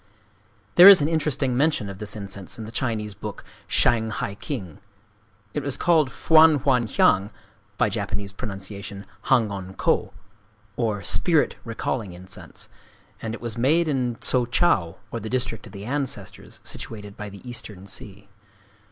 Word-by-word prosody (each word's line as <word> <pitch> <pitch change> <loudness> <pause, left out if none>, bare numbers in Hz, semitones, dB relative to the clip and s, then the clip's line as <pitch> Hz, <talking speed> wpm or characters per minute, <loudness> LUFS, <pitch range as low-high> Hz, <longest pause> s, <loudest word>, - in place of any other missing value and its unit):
There 180 - +11
is 200 -2 +11
an - - +2
interesting 145 -5 0
mention 145 -5 +2
of 100 -1 -8
this 105 0 -6
incense 100 -2 -6
in 110 - -6
the 110 - -8
Chinese 110 -4 -2
book, 105 +1 -7 0.2
Shang 110 -2 +3
hai 100 -2 -3
king. 100 - -6 0.7
It 150 - -1
was 140 -1 0
called 160 -6 +3
Fwan 160 0 +5
hwan 125 -5 +3
hiang 100 -1 +3 0.5
(by - - +3
Japanese 100 -1 -3
pronunciation, 100 0 -6 0.2
Hangon 100 -7 +1
kō), 110 -1 +1 0.6
or 110 -4 -1
"Spirit 165 -5 +2
Recalling 115 -3 -3
Incense;" 90 +2 -7 0.5
and 115 0 -3
it - - -12
was 115 -1 -3
made 160 +7 +3
in 125 -5 0
Tso 125 -2 +2
Chau, 110 - +2
or 115 - -3
the 110 0 -6
District 120 -3 0
of - - -13
the 100 0 -8
Ancestors, 130 -6 -4
situated 105 -2 -5
by 105 0 -7
the 100 +5 -12
Eastern 105 -6 -6
Sea. 100 0 -5
110 Hz, 150 wpm, -24 LUFS, 100-130 Hz, 0.7 s, There